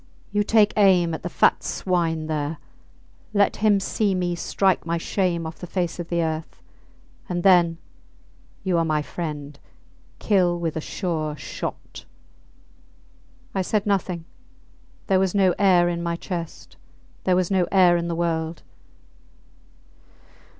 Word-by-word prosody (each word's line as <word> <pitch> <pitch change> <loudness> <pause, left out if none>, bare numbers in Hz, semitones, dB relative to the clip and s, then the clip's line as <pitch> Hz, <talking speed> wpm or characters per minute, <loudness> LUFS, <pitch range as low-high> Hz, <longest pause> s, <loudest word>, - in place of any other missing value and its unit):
You 205 0 +1
take 210 0 +4
aim 180 -5 +4
at 160 - -4
the 175 - -4
fat - - +3
swine 165 -4 -1
there. 155 0 -2 0.8
Let 200 0 +3
him 210 -1 +3
see 195 0 0
me 180 -1 -1
strike 190 +2 +1
my 170 0 -1
shame 170 -1 -1
off 160 0 -7
the 180 - -7
face 175 -1 -2
of 170 - -5
the 170 -1 +1
earth 160 0 -4 0.7
and 175 -1 -2
then... 175 -3 +5 0.9
you 180 -3 +1
are - - +2
my 155 -2 0
friend 150 -4 -6 0.6
kill 180 -4 +2
with 165 -2 -2
a 160 - -2
sure 155 -4 -3
shot. - - -7 1.5
I 190 - 0
said 205 +2 0
nothing; 185 -4 -1 0.8
there 190 -2 +3
was 190 0 0
no 190 -3 +4
air 180 -3 +5
in 170 -1 -2
my 170 0 -1
chest 170 -2 -7 0.5
there 185 - +3
was 185 0 0
no 185 -3 +2
air 180 -3 +5
in 170 0 -1
the 170 - -2
world. 165 -1 -2
175 Hz, 145 wpm, -23 LUFS, 165-190 Hz, 1.5 s, then